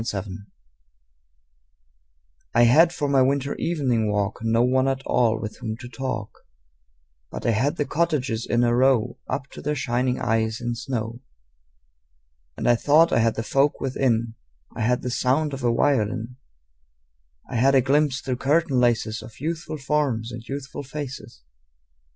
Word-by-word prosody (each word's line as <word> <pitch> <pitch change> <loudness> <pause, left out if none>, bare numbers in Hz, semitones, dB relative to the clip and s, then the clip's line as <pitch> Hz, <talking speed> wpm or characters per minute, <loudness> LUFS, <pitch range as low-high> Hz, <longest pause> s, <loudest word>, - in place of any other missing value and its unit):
Good 115 - -3
Hours 100 +1 -4 2.3
I 120 - +6
HAD 160 +9 +6
for 150 -4 -2
my 140 -1 +3
winter 140 +1 +1
evening 125 -10 0
walk 105 0 -1
No 115 +1 +2
one 130 +1 +2
at 135 0 -1
all 115 -2 +2
with 110 -1 -6
whom 110 -1 -4
to 120 - -9
talk, 115 -3 -5 0.9
But - - -7
I 115 - +3
had 130 +7 +1
the 145 - -1
cottages 140 -9 -1
in 120 0 +2
a 120 0 +2
row 125 -2 +2
Up 135 - -2
to - - -9
their 150 +1 -1
shining 125 -1 -1
eyes 110 0 0
in 120 0 -2
snow. 115 -1 -4 1.4
And - - -2
I 120 - +6
thought 155 +6 +4
I - - +4
had 115 -1 +2
the 115 - -3
folk 140 +4 +1
within: 120 -4 0 0.4
I - - -4
had 125 +3 +1
the 125 - -2
sound 140 +5 +1
of 135 -1 -6
a 120 - +3
violin; 115 -1 0 1.1
I 125 - -3
had 135 +4 +4
a 130 - +6
glimpse 140 +1 +1
through 130 -2 -3
curtain 145 0 +2
laces 115 -2 +1
Of 110 0 -13
youthful 160 +1 -4
forms 135 -5 -1
and 115 0 -7
youthful 140 +1 -6
faces. 135 - -8
125 Hz, 165 wpm, -24 LUFS, 115-140 Hz, 2.3 s, I